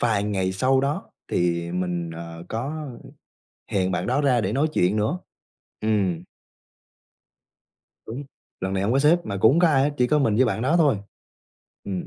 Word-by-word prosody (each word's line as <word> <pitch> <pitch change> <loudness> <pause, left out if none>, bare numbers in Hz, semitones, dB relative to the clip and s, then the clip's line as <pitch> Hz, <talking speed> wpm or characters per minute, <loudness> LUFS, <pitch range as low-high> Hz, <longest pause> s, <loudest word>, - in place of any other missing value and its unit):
vài 110 -4 +2
ngày 95 -3 -1
sau 130 +7 +2
đó 145 +7 -2 0.2
thì 85 -1 0
mình, 90 -2 -2
ờ, 85 +1 -8
có 145 +6 -4 0.8
hẹn 95 -1 +1
bạn - - -2
đó 130 +4 +1
ra 125 -5 +3
để 100 +2 -1
nói 145 +4 +2
chuyện 90 +4 +2
nữa. 110 +12 0 0.6
Ừm. 95 -6 0 1.8
Đúng, 130 +6 -6 0.4
lần 95 +1 -2
này 95 0 0
hổng 105 +4 +1
có 135 - +3
sếp 150 +5 +5
mà 100 - -3
cũng 110 - +6
hông 170 - +3
có 175 - +5
ai 135 -4 +3
hết, 145 - +1
chỉ 125 -3 +3
có 150 - +2
mình 115 -7 +2
với 130 - +5
bạn 115 -1 -1
đó 155 +7 +2
thôi. 145 -8 +4 0.9
Ừm. 95 -3 -4
110 Hz, 185 wpm, -24 LUFS, 95-140 Hz, 1.8 s, cũng